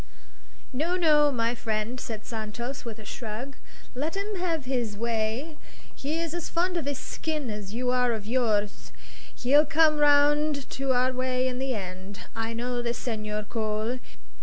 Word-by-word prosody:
"No, 320 +7 +1
no, 300 -4 +5
my 230 -2 +1
friend," 225 +1 -2
said 220 -3 -5
Santos, 230 +4 -4
with 230 -2 -6
a 215 - -11
shrug; 235 +6 -5 0.4
"let 295 +7 -2
him 410 +2 -2
have 335 -6 -1
his 240 -5 -1
way. 235 +7 -1 0.4
He 300 +4 -2
is 330 -1 -2
as 345 -2 -3
fond 355 +2 +1
of 335 -5 -1
his 285 -2 -1
skeen 300 -6 -3
as 210 0 -6
you 250 +1 +1
are 250 -1 +3
of 220 -3 -3
yours; 215 -3 0 0.4
he'll 285 +4 +5
come 310 0 +4
round 290 0 +4
to 270 0 0
our 255 0 +3
way 255 0 +1
in 250 -1 -2
the 265 -1 0
end. 190 0 -6
I 225 0 -1
know 245 +1 -1
this 240 0 -1
Senhor 215 -3 -2
Cole. 220 +2 -1
250 Hz, 165 wpm, -28 LUFS, 220-290 Hz, 0.4 s, no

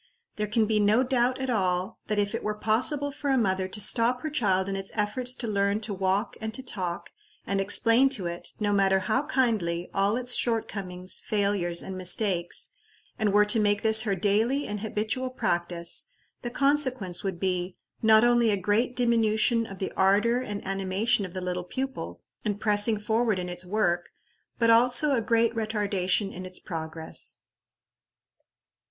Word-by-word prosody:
There 210 0 -1
can 215 +2 +2
be 215 0 +1
no 210 +4 +3
doubt 255 0 +1
at 265 -1 -1
all 185 -4 -1
that 210 - -1
if 205 0 0
it 230 - -3
were 210 0 -2
possible 255 +7 +1
for 285 0 -4
a 265 - +3
mother 190 -5 +1
to 195 +3 -5
stop 235 +3 +2
her 310 - -3
child 195 -9 +1
in 195 - -2
its 195 0 -4
efforts 235 +4 -1
to 240 - -4
learn 200 0 +1
to 210 -1 -4
walk 190 +3 -1
and 220 0 -3
to 265 - -5
talk, 180 -8 -4 0.3
and 195 0 0
explain 230 +6 +4
to 190 - -6
it, 170 0 -4
no 205 -1 0
matter 195 -1 +3
how 215 +8 +1
kindly, 205 - 0
all 200 +3 +1
its 250 0 -2
shortcomings, 195 -7 -2
failures, 200 -5 0
and 190 - -6
mistakes, 185 -1 0 0.5
and 215 -2 +1
were 210 +1 +5
to 220 +2 +2
make 205 -1 +1
this 220 0 +6
her 205 -3 -1
daily 220 +9 +1
and 210 0 -4
habitual 220 +4 -2
practice, 175 -7 -1 0.3
the 240 - -4
consequence 260 -8 +1
would 190 -3 -3
be, 180 -1 -2 0.3
not 220 0 +6
only 240 -1 +4
a 205 - +2
great 210 +6 0
diminution 230 -1 +2
of 195 - -9
the 190 - -4
ardor 210 +6 +3
and 205 -5 -6
animation 195 +3 0
of 180 - -15
the 185 - -3
little 180 0 -3
pupil, 180 - -5 0.2
in 205 -1 -1
pressing 210 0 +3
forward 220 0 0
in 180 -1 -4
its 180 0 -4
work, 175 -4 0 0.5
but 230 -1 +3
also 245 +5 +4
a 235 - +1
great 230 +1 +2
retardation 205 -3 -1
in 185 - -7
its 185 0 -5
progress. 160 -1 -7
210 Hz, 175 wpm, -27 LUFS, 190-230 Hz, 0.5 s, this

